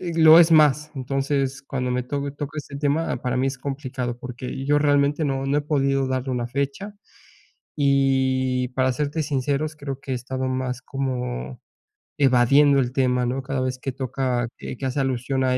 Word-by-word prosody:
lo 165 -2 +6
es 165 -1 +5
más. 150 -1 +4
Entonces, 135 0 -1
cuando 130 -2 -3
me 125 0 0
to 140 +1 -3
toca 145 +1 -5
ese 140 -1 -7
tema, 145 +3 0
ah, - - -5
para 125 0 -1
mí 130 - +1
es 135 - -4
complicado 130 -3 -4
porque 125 +2 -6
yo 145 +1 +4
realmente 145 +1 +2
no 135 -1 -1
no 140 +2 +1
he 150 - -2
podido 135 -2 +1
darle 130 0 -2
una 120 -1 -2
fecha, 140 - -3 0.9
y 130 -2 +2
para 130 0 +1
serte 150 +4 -2
sinceros, 145 +2 -1
creo 140 -3 -6
que 135 - -7
he - - 0
estado 130 +1 -3
más 130 -1 -2
como 125 - -4 0.6
evadiendo 140 +2 +5
el 125 -2 0
tema, 125 -2 +1
¿no?, 130 +3 -2
cada 135 0 -2
vez 130 0 -2
que 135 - -3
toca 130 -1 -1
que - - -7
que 135 - -5
hace 130 +2 -1
alusión 130 0 -1
a 130 0 +2
135 Hz, 185 wpm, -23 LUFS, 130-145 Hz, 0.9 s, lo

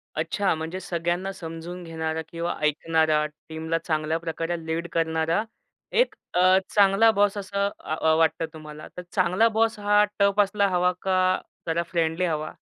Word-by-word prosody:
अच्छा! 200 -2 0
म्हणजे 160 +3 -5
सगळ्यांना 175 +1 -2
समजून 170 0 -7
घेणारा 160 -1 -3
किंवा 170 +1 -3
ऐकणारा, 155 0 +2 0.2
टीमला 160 +1 -2
चांगल्या 155 -1 -1
प्रकारे 165 +1 -3
लीड 165 +1 -2
करणारा, 165 +3 +1 0.5
1 - - +2 0.2
अ, 185 +1 +5 0.2
चांगला 200 +2 +5
बॉस 205 -1 +2
असं 200 0 -1
आ 155 - -2
अ, 160 0 +2
वाटतं 165 0 +2
तुम्हाला. 155 -1 -10
तर - - -4
चांगला 185 +4 +3
बॉस 225 0 +2
हा 205 0 +4 0.2
टफ 200 0 +3
असला 200 0 +1
हवा 180 0 +2
का 190 -1 0 0.5
जरा 165 +1 0
फ्रेंडली 165 +1 +1
हवा? 155 -2 -2
170 Hz, 150 wpm, -25 LUFS, 160-195 Hz, 0.5 s, अ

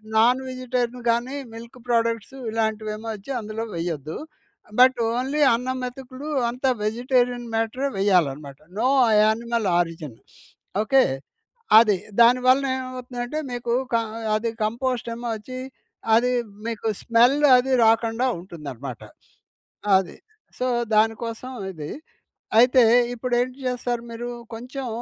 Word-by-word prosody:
Non 240 +4 +5
vegetarian 250 -1 -3
గాని 240 +4 -1 0.2
milk 230 +2 -11
products 230 +1 0
ఇలాంటివేమో 220 0 -2
వచ్చి 210 +6 -9
అందులో 215 0 -5
వెయ్యొద్దు. 160 -3 -4 0.6
బట్ 255 0 +6
ఓన్లీ 260 +5 -1
అన్నం 255 +2 -2
మెతుకులు 255 +2 -7 0.2
అంతా 255 +3 -1
వెజిటేరియన్ 245 +2 0
మ్యాటరే 225 +5 -1
వెయ్యాలనమాట. 150 -8 +1 0.2
నో 230 - +1 0.2
అ - - +2
యానిమల్ 230 0 +1
ఆరిజన్. 165 -7 -2 0.7
ఓకే. 265 +5 +4 0.8
అది. 215 -4 +4 0.2
దాని 240 +2 +6
వలన 270 +2 +4
ఏవవుతుందంటే, 255 +2 -5
మీకు 240 -1 -2 0.2
క - - +4
అ 225 +1 -7
అది 225 +2 -1 0.2
కంపోస్ట్ 240 +2 -2
ఏమో 240 0 -5
వచ్చి, 255 +4 -8 0.6
అది 245 +2 +3 0.4
మీకు 225 -1 -3
స్మెల్ 240 +4 +4 0.2
అదీ 260 +1 +1
రాకుండా 225 +2 +2
ఉంటుందనమాట. 140 -8 -8 1.0
అది. 190 -3 -4 0.4
సో, 250 - 0 0.3
దాని 220 +1 +4
కోసం 230 +3 -6 0.2
ఇది. 155 -5 -7 0.7
అయితే, 250 +2 +6 0.3
ఇప్పుడేంటి 250 +1 -1
చేస్తారు 245 -1 -2
మీరు! 235 +1 -5 0.3
కొంచెం 255 +3 -6
235 Hz, 120 wpm, -23 LUFS, 215-250 Hz, 1.0 s, బట్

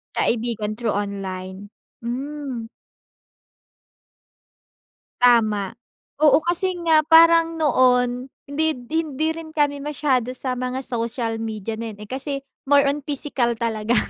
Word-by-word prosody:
Kaibigan 225 -2 -1
through 225 -4 -1
online, 195 -1 -5 0.3
hmm. 255 -1 -5 2.5
Tama, 215 -5 +3 0.5
oo 305 -1 +6
kasi 355 +2 0
nga 320 -1 +5
parang 330 0 +6
noon 250 -3 +2 0.2
hindi 310 +2 0 0.2
hindi 315 -2 -1
rin 325 -1 -8
kami 290 -2 +1
masyado 270 -4 0
sa 255 0 -3
mga 255 +1 -3
social 230 -1 -3
media 220 -1 -4
din, 225 -3 -6
eh, 210 - -9
kasi 275 +2 -4 0.3
more 285 -1 +5
on 285 +1 0
pisikal 270 -4 +1
talaga. 225 0 -1
250 Hz, 110 wpm, -22 LUFS, 225-295 Hz, 2.5 s, oo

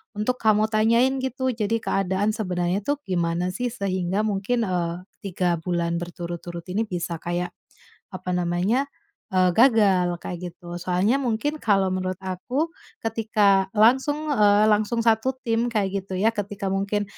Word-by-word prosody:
untuk 230 +5 -1
kamu 215 0 +3
tanyain 230 +5 +3
gitu, 260 0 -1
jadi 220 -1 0
keadaan 195 +2 0
sebenarnya 180 -3 -1
tuh 290 - +1
gimana 175 -2 -1
sih 245 +7 -2
sehingga 190 -2 -1
mungkin 215 +3 0
eee, 175 -3 -2 0.2
3 180 -3 -1
bulan 170 0 -1
berturut-turut 175 0 -6
ini 220 +4 -1
bisa 175 -3 -4
kayak, 175 +1 -3 0.6
apa 185 -1 -4
namanya, 180 +9 +1 0.4
eee, 185 -1 +3
gagal 195 -6 +4
kayak 180 - -4
gitu, 175 0 -9
soalnya 185 +7 +1
mungkin 275 +5 -1
kalau 195 -3 +2
menurut 185 0 -2
aku, 245 - -2 0.3
ketika 210 -4 +2
langsung 260 +7 +4 0.2
eee, 210 -4 +5
langsung 215 +2 +1
satu 230 +3 +2
tim 230 0 +1
kayak 200 -3 0
gitu 190 -1 -5
ya 215 +5 +2
ketika 205 -2 -3
mungkin 200 +2 0
200 Hz, 145 wpm, -24 LUFS, 180-225 Hz, 0.6 s, eee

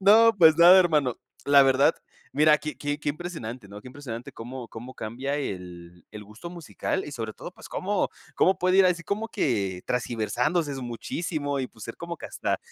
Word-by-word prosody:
No, 220 +4 +7
pues 160 -3 +7
nada, 175 +3 +9
hermano. 150 -8 +2 0.3
La 140 -1 +7
verdad, 135 +1 +4 0.4
mira, 150 +1 +5
qué 150 0 -6
qué 145 0 -2
qué 145 - -2
impresionante, 140 - -6
¿no?, 100 +1 -10
qué - - -15
impresionante 125 -3 -8
cómo 125 +2 -8
cómo 120 +3 -9
cambia 130 +6 -4
el 90 - -7
el 105 -1 -9
gusto 105 +11 -10
musical 175 +2 -4
y 145 - -8
sobre 115 -3 -4
todo, - - -9
pues - - -13
cómo 200 +1 -1 0.2
cómo 190 - +3
puede 185 +2 +3
ir 190 - +7
así, 175 -2 +1
como 215 +4 -2
que 100 - -1
tergiversándose 125 +6 -1
es 135 - -5
muchísimo 145 +4 -3
y, 130 - -3
pues, 110 -3 -12
ser 115 - -7
como 170 0 -6
que - - -7
hasta - - -2
140 Hz, 195 wpm, -26 LUFS, 115-170 Hz, 0.4 s, nada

